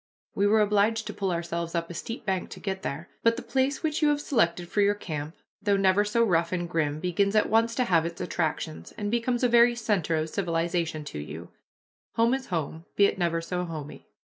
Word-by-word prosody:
We 200 - +2
were 215 +1 +4
obliged 210 +2 +2
to 210 - -5
pull 195 -2 -1
ourselves 170 0 -3
up 170 0 -2
a - - -6
steep 230 +7 -6
bank 190 -2 -1
to - - -9
get 190 -1 -3
there. 160 +3 -4
But 230 0 +4
the - - -6
place 270 +3 0
which 310 0 0
you 305 - +4
have 290 -1 +2
selected 180 -12 +1
for 205 - +1
your 205 0 +3
camp, 155 -5 -5 0.3
though 200 -1 +2
never 195 +1 +4
so 210 +3 +2
rough 170 -5 +2
and 175 -1 -1
grim, 155 -3 -1
begins 195 +4 +1
at 215 - +3
once 230 +1 +3
to 255 - +2
have 170 -8 +3
its 170 +1 -5
attractions, 160 -3 -3
and 205 -1 -2
becomes 240 +1 0
a - - +6
very 240 0 +5
center 205 -8 0
of 155 0 -2
civilization 170 -3 -1
to 75 - -6
you: 80 +3 -8 0.7
"Home 230 +2 +3
is 265 -1 -2
home, 165 -1 -3
be 200 - +6
it 195 - 0
never 170 -1 +1
so 180 +1 -3
homely." 155 -4 -7
185 Hz, 220 wpm, -27 LUFS, 165-225 Hz, 0.7 s, a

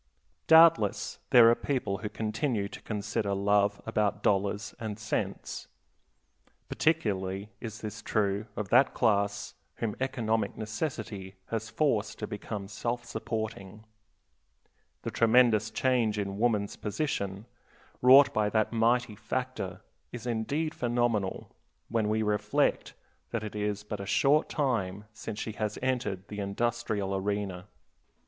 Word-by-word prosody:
Doubtless 160 -10 +5
there 120 -2 +8
are - - +6
people 120 -7 -2
who 105 +1 -4
continue 110 0 -1
to - - -10
consider 105 -1 -2
love 100 +1 +2
above 105 -1 0
dollars 100 +1 +1
and 110 -3 -4
cents. 110 0 -3 1.0
Particularly 100 - 0
is 110 -2 -7
this 110 0 -6
true 105 0 0
of 105 -2 -4
that 130 +3 +4
class 100 -1 +1 0.2
whom 110 -3 -3
economic 115 -5 -1
necessity 110 -4 -4 0.2
has 115 0 -2
forced 115 -7 0
to 105 - -4
become 105 -1 -5
self 120 +3 -3
supporting. 110 -2 -5 1.2
The - - -3
tremendous 115 -2 +4
change 115 -2 +1
in 100 -1 -3
woman's 105 -4 +1
position, 100 -4 -3 0.6
wrought 135 +3 +8
by 105 -1 +2
that 110 +1 +1
mighty 115 0 +2
factor, 110 -3 -4 0.3
is 120 -1 -7
indeed 140 +7 -1
phenomenal 120 -5 -1 0.4
when 110 -2 +1
we 110 +1 +1
reflect 105 -1 +1 0.3
that 115 -2 -3
it 105 -1 -6
is 105 0 -2
but 105 -1 -5
a 100 - -6
short 145 +8 +3
time 105 - -1
since 110 -1 -6
she 110 - -3
has 105 0 -3
entered 120 -7 -1
the 105 - -6
industrial 105 -1 -1
arena. 95 -1 -2
110 Hz, 125 wpm, -29 LUFS, 100-120 Hz, 1.2 s, there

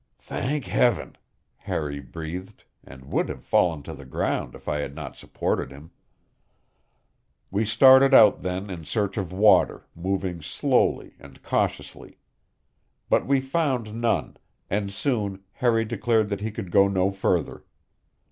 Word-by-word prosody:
"Thank 140 -2 -3
Heaven!" 115 +6 +1 0.4
Harry 75 -2 -4
breathed, 85 +8 -8 0.2
and 65 0 -13
would - - 0
have - - -7
fallen 80 -5 +1
to 80 - -8
the 70 -2 -11
ground 65 - -2
if - - -15
I 75 - -1
had 70 -1 -5
not 75 -4 -7
supported - - -3
him. 70 +5 -13 1.6
We 105 +3 0
started 130 +5 +6
out 110 -7 +7
then 95 +2 -4
in 85 -3 -7
search 100 +5 -2
of 95 -4 -3
water, 105 +3 +3
moving 90 -1 -3
slowly 75 - 0
and 70 -2 -15
cautiously. - - -3 0.9
But - - +3
we 135 -1 +3
found 135 -6 -1
none, 115 +1 -1 0.3
and 100 0 -1
soon 100 -4 -2
Harry 115 -1 +1
declared 115 -1 0
that 100 -1 -3
he 110 - -2
could 95 -4 -7
go 100 +2 +5
no 95 0 +1
further. 95 0 -1
100 Hz, 140 wpm, -25 LUFS, 85-115 Hz, 1.6 s, out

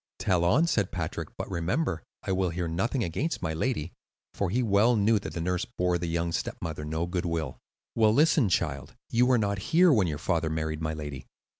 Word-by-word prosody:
"Tell 90 -4 +1
on," 125 - +4
said 105 - 0
Patrick. 80 -4 -4
"But - - -4
remember, 85 - -1 0.2
I - - -2
will 95 -1 +1
hear 85 +1 -2
nothing 115 +10 -1
against 130 - -2
my 80 - -1
lady;" 85 - -2 0.4
for 100 - -1
he 125 +7 +1
well 110 +3 +4
knew 105 +1 +3
that - - -7
the - - -4
nurse 90 +1 -1
bore 90 -1 +1
the 85 - -3
young 85 0 -1
stepmother 80 -2 -4
no 80 +2 -2
good 90 0 -2
will. 80 -5 -3 0.3
"Well, 110 -2 +4
listen, 145 -2 +4
child. - - -1 0.2
You 120 +2 +4
were 130 -1 +4
not 100 -3 0
here 175 0 +6
when 105 -7 +3
your 75 -3 -2
father 80 +1 0
married 80 0 -2
my 80 0 -2
lady. 75 -3 -7
90 Hz, 205 wpm, -28 LUFS, 80-110 Hz, 0.4 s, here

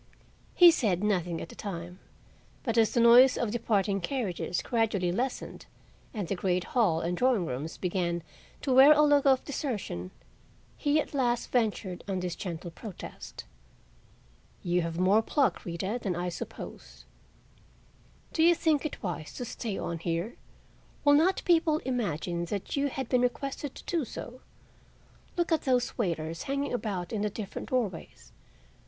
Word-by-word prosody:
He 350 -1 +9
said 205 - 0
nothing 180 -5 0
at - - -7
the - - -11
time, 175 -2 -6 0.6
but 230 -3 -1
as 225 -2 +4
the 240 - +1
noise 245 +3 +7
of 235 -3 -1
departing 205 -4 0
carriages 185 -6 -2
gradually 215 -6 +1
lessened 250 +7 -3 0.4
and 205 -6 -4
the - - -1
great 180 -1 0
hall 190 -10 +3
and 175 +1 -1
drawing 245 -4 +2
rooms 145 +3 -5
began 175 -2 -1 0.4
to 270 - +1
wear 270 +4 +9
a 300 0 +4
look 290 -1 +4
of 265 -1 +4
desertion 215 - -4 0.7
he 290 +1 +2
at 305 - -3
last 240 -4 0
ventured 215 -6 -1
on 190 -2 -1
this 180 -1 -3
gentle 175 -2 -6
protest: 200 +2 -9 1.2
"You 175 0 +1
have 165 0 -3
more 190 +5 +4
pluck, 240 -3 0
Rita, 190 +7 -3
than 190 -5 -1
I 175 +1 -2
supposed. 175 - -8 1.3
Do 320 - +1
you 340 +1 +6
think 310 -2 +1
it 290 - -11
wise 175 -5 -4
to 245 - -4
stay 220 -3 -4
on 170 -1 -3
here? 170 +6 -2 0.7
Will 290 - +7
not 335 +6 +3
people 325 -3 +4
imagine 175 - -2
that 200 +2 -4
you 280 0 +1
have 265 -2 -4
been 250 0 +2
requested 275 +2 -2
to - - -10
do 335 -3 -1
so? 250 +1 -8 1.0
Look 345 0 0
at 320 - +3
those 255 -2 +1
waiters 165 -6 -2
hanging 280 0 -1
about 200 -7 -3
in 210 - -1
the 210 - 0
different 205 -1 -6
doorways. 190 - -3
215 Hz, 160 wpm, -29 LUFS, 175-260 Hz, 1.3 s, He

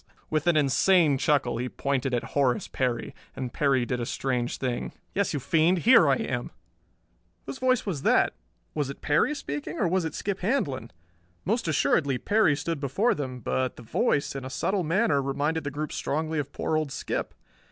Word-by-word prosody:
With 155 +1 0
an 170 -3 +4
insane 150 +1 +4
chuckle 135 -6 +1
he 125 +1 -2
pointed 135 -1 -1
at 120 -1 0
Horace 130 -4 +1
Perry. 125 -2 -2 0.2
And 130 -2 -5
Perry 135 -4 +2
did 125 0 -2
a 120 - -2
strange 125 -2 -2
thing. 125 -2 -3 0.2
"Yes, 200 0 0
you 145 - -1
fiend, 160 +6 +3
here 255 +3 +7
I - - +5
am!" - - -3 1.0
Whose 265 - -7
voice 255 -1 +2
was 170 -9 -3
that? - - +3 0.4
Was 145 -3 -1
it 140 - -8
Perry 150 - +2
speaking, 145 - -5
or 190 - +1
was 185 +1 +1
it 160 -2 -4
Skip 200 -1 -3
Handlon? 155 - -1 0.6
Most 225 +1 0
assuredly 140 -3 +2
Perry 205 - +3
stood 150 +2 -3
before 145 - +1
them, 130 -4 -5
but 130 +2 -1
the 120 - -12
voice, 155 - 0
in 135 - -5
a 130 - -6
subtle 185 +8 -1
manner, 160 -3 +2
reminded 145 +4 -1
the - - -1
group 150 +1 -4
strongly 155 +1 -2
of 145 -1 -4
poor 160 - -2
old 155 -3 -1
Skip. - - -3
145 Hz, 185 wpm, -27 LUFS, 130-170 Hz, 1.0 s, here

